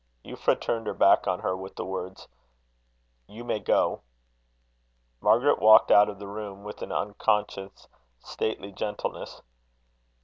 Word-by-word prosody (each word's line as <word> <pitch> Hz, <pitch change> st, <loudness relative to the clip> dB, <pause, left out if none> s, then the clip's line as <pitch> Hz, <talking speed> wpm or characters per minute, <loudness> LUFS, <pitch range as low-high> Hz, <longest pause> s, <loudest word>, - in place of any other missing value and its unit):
Euphra -, -, -1 dB
turned 115 Hz, -2 st, -3 dB
her -, -, -3 dB
back 100 Hz, -, +4 dB
on 90 Hz, -1 st, -1 dB
her, 90 Hz, -, -1 dB
with 95 Hz, +1 st, -9 dB
the -, -, -5 dB
words: 95 Hz, 0 st, -7 dB, 1.0 s
"You 115 Hz, +3 st, -11 dB
may 120 Hz, -, -2 dB
go." -, -, +1 dB, 1.2 s
Margaret 130 Hz, -, +3 dB
walked 110 Hz, 0 st, +6 dB
out 105 Hz, 0 st, +6 dB
of 100 Hz, -, -8 dB
the 100 Hz, -, -9 dB
room 100 Hz, -1 st, -8 dB
with 105 Hz, 0 st, -9 dB
an -, -, -6 dB
unconscious 100 Hz, -1 st, -2 dB, 0.3 s
stately 100 Hz, -, -4 dB
gentleness. 105 Hz, +1 st, -6 dB
105 Hz, 135 wpm, -26 LUFS, 95-105 Hz, 1.2 s, walked